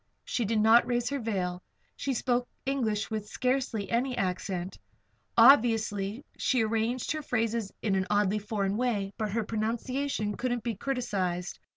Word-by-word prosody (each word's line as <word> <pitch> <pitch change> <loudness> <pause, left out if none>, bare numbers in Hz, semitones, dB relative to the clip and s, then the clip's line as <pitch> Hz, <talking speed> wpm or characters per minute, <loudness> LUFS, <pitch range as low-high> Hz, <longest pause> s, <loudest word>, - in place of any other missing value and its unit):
She 240 - -1
did 220 +1 +1
not 225 +2 +6
raise 240 -1 0
her 280 0 -2
veil. 185 -6 -2 0.3
She 275 -2 -2
spoke 245 +1 0 0.2
English 225 -6 -1
with 215 -1 -3
scarcely 250 -5 -1
any 250 +2 0
accent. 185 0 -2 0.6
Occasionally 225 -3 +4
she 255 -4 +2
arranged 225 +3 0
her 310 -1 -2
phrases 230 -5 -1
in 205 - +1
an 190 0 +1
oddly 205 0 +2
foreign 205 -1 -1
way; 210 -5 -1
but 215 -1 -1
her 225 +2 0
pronunciation 225 +1 -2
could 255 - -1
not 240 -2 -2
be 235 -1 -1
criticised. 195 -8 -2
225 Hz, 155 wpm, -29 LUFS, 205-245 Hz, 0.6 s, not